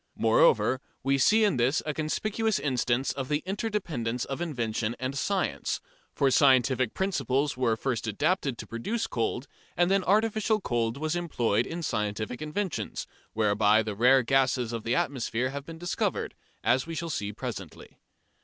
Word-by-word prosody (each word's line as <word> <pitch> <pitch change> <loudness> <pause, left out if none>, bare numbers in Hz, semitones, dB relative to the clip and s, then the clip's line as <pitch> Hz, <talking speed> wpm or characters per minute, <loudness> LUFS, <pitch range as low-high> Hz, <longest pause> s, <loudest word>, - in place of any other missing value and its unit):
Moreover, - - +3 0.2
we 135 +1 +2
see 215 +11 +5
in 200 -10 +2
this 125 +5 +2
a 155 - -1
conspicuous 215 +8 -1
instance 130 -2 0
of 135 -2 -5
the 150 0 0
interdependence 185 - -2
of 135 +4 -5
invention 115 -8 -2
and 130 +2 -3
science, 195 +7 -1 0.3
for 140 -2 +2
scientific 130 -3 +4
principles 140 - 0
were 125 -3 +1
first 120 -2 -2
adapted 135 - 0
to - - -7
produce 215 - -3
cold, 120 - -2 0.3
and 175 +2 +3
then 195 -1 +3
artificial 215 +2 +2
cold 120 - -1
was 155 +3 -1
employed 120 -10 0
in 170 +1 -5
scientific 110 0 -2
investigations, 160 +4 -3 0.3
whereby 105 0 +3
the 105 -1 -3
rare 125 +5 +5
gases 130 -2 +1
of 115 - -3
the 120 +2 0
atmosphere 130 -1 -1
have 140 0 -6
been 165 0 -8
discovered, 175 +1 -2 0.3
as 130 +5 +2
we 165 - -5
shall 170 0 -3
see 105 -4 -2
presently. 105 - -8
135 Hz, 155 wpm, -28 LUFS, 120-175 Hz, 0.3 s, see